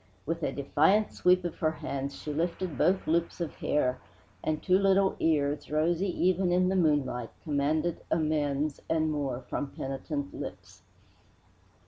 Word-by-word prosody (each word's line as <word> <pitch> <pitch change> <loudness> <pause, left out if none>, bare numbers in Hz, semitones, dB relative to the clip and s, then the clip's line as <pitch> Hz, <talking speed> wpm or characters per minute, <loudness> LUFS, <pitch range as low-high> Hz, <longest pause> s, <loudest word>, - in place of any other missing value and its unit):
With 165 +2 -2
a - - 0
defiant 160 +9 +2
sweep 180 0 +3
of 175 - -4
her 155 - +2
hands 140 -2 -4
she 150 - -5
lifted 170 +1 -2
both 185 +8 +2
loops 170 +3 0
of 170 -3 -3
hair, 130 -4 0 0.4
and 155 -1 0
two 185 +2 +3
little 195 0 +3
ears, 145 -2 +1
rosy 165 +5 +1
even 185 0 +1
in 180 +1 +3
the 190 - +1
moonlight, 145 - +1
commanded 155 +3 0
amends 150 -2 0
and 160 -1 +1
more 135 -4 -2
from 140 - -4
penitent 140 +2 -4
lips. - - -8
155 Hz, 145 wpm, -29 LUFS, 145-175 Hz, 0.4 s, sweep